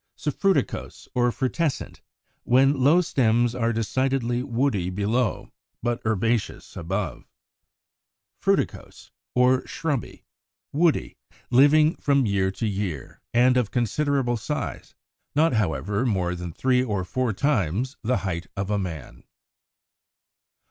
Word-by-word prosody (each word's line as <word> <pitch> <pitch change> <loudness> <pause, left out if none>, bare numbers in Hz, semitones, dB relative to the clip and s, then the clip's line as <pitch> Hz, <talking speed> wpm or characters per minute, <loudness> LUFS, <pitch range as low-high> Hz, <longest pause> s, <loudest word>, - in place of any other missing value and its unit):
Suffruticose 190 +6 -1
or 120 -1 +2
Frutescent, 135 +3 -2 0.4
when 135 +3 +4
low 160 +6 +6
stems 120 -6 +2
are 115 -1 0
decidedly 120 +2 0
woody 120 -8 0
below, 105 +4 -1 0.3
but 120 0 -1
herbaceous 110 +1 -1
above. 95 +4 -3 1.2
Fruticose - - -1 0.2
or 125 +1 +4
Shrubby, 150 -6 -3 0.5
woody, 160 +2 +1 0.3
living 150 +5 +5
from 140 -2 +2
year 100 -2 +1
to 95 +4 -4
year, 95 - -4
and 125 +2 +4
of 120 -5 +1
considerable 125 +1 0
size, 110 - -5 0.4
not, 160 +1 +3
however, 100 - 0
more 95 -8 0
than 90 -1 -5
three 125 +7 +2
or 105 -6 -1
four 125 +4 -1
times 115 - 0
the 120 +1 +1
height 85 -3 -3
of 100 +1 -2
a 105 - +1
man. 75 -9 -6
120 Hz, 115 wpm, -25 LUFS, 100-130 Hz, 1.2 s, low